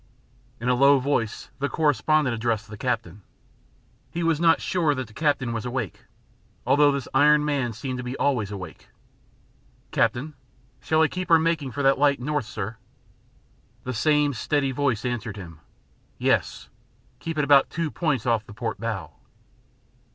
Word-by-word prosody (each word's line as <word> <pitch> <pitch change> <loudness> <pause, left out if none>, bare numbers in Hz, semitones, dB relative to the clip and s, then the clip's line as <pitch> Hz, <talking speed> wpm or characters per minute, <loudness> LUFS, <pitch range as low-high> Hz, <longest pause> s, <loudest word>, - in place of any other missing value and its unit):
In 120 - -4
a 125 - +4
low 140 +3 +5
voice 125 -7 -2
the 140 +1 -1
correspondent 150 -2 +2
addressed 115 -1 -1
the 105 - -8
captain. 110 -5 -3 0.9
He 170 +1 -3
was 165 -2 +1
not 165 -1 +4
sure 160 -5 +1
that 130 -1 -3
the 110 - -17
captain 140 -4 0
was 115 - -3
awake, 125 -6 -4 0.6
although 145 0 +5
this 140 -3 -3
iron 150 +2 +5
man 140 -5 0
seemed 125 +4 -5
to - - -4
be 125 +2 -5
always 125 -8 0
awake. 95 -3 -9 1.0
"Captain, 120 +7 0 0.5
shall 160 0 +2
I - - +4
keep 185 +3 -5
her 165 - +7
making 160 -3 0
for 145 +3 -3
that 135 0 +4
light 140 -2 +3
north, 145 0 -2
sir?" 105 +1 -5 1.1
The 125 - -4
same 150 +4 +2
steady 135 +3 0
voice 130 -4 -1
answered 115 -4 -3
him. 85 -5 -10 0.6
"Yes. - - 0 0.5
Keep 165 -1 -5
it 150 - +2
about 140 -1 +5
two 165 -2 -3
points 150 -9 -1
off 115 -3 +1
the 105 - -11
port 115 -3 -4
bow." 100 -9 -4
135 Hz, 160 wpm, -25 LUFS, 115-150 Hz, 1.1 s, her